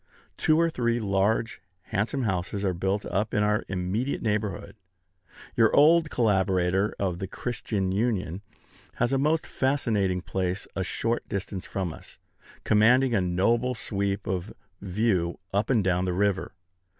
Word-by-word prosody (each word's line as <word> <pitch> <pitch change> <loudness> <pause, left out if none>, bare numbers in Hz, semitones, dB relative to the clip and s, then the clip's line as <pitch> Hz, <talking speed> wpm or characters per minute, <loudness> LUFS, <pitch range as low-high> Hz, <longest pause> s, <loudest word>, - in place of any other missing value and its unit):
Two 155 0 +3
or 165 0 +3
three 120 -4 0
large, 105 +2 0 0.2
handsome 110 +7 -1
houses 100 0 -2
are 95 - +1
built 95 +4 -1
up 105 +3 -1
in 105 - +3
our 105 0 +1
immediate 95 +8 -2
neighborhood. 105 -4 -2 0.8
Your 115 -1 +4
old 160 +2 +5
collaborator 95 -4 +1
of 90 -3 -2
"The 95 - -4
Christian 100 -3 -3
Union" 100 -4 -1 0.5
has 120 - 0
a 135 - +2
most 155 +3 +1
fascinating 110 -9 0
place 95 0 -2
a 95 - -1
short 115 +5 -1
distance 100 -2 -4
from 95 -5 -3
us, - - -13 0.5
commanding 120 +4 +4
a 105 - +3
noble 115 +8 +1
sweep 100 -3 -2
of 95 -1 -3 0.3
view 95 -3 0 0.2
up 100 +2 0
and 115 -6 +3
down 90 0 +1
the 90 - -1
river. 100 0 0
100 Hz, 145 wpm, -26 LUFS, 95-115 Hz, 0.8 s, old